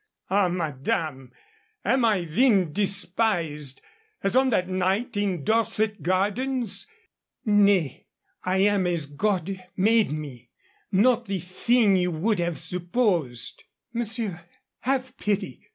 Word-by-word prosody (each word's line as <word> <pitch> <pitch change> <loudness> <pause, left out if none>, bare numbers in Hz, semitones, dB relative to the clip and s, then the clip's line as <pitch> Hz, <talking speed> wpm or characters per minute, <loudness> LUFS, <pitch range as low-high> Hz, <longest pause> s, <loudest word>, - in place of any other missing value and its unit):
"Ah, 200 -1 +4
madame, 150 -4 -2 0.5
am 260 +1 +2
I 205 -5 +2
then 185 - +2
despised, 180 - 0 0.4
as 195 - 0
on 260 0 +4
that 185 -6 +1
night 190 +5 0
in 195 -6 -1
Dorset 220 +1 +1
Gardens? 215 - -1 0.6
Nay, 200 - +3 0.4
I 185 +1 0
am 200 -3 +3
as 170 -4 -1
God 185 +4 -2
made 220 +1 +3
me 135 -6 -7 0.4
not 235 +4 +3
the 195 0 -1
thing 195 +4 +2
you 180 0 +1
would 180 +5 0
have 170 -2 -1
supposed 175 - -1 0.2
" - - -51
"Monsieur, 225 -6 -3 0.4
have 260 0 -1
pity." 205 -1 -3
195 Hz, 120 wpm, -25 LUFS, 170-220 Hz, 0.6 s, Ah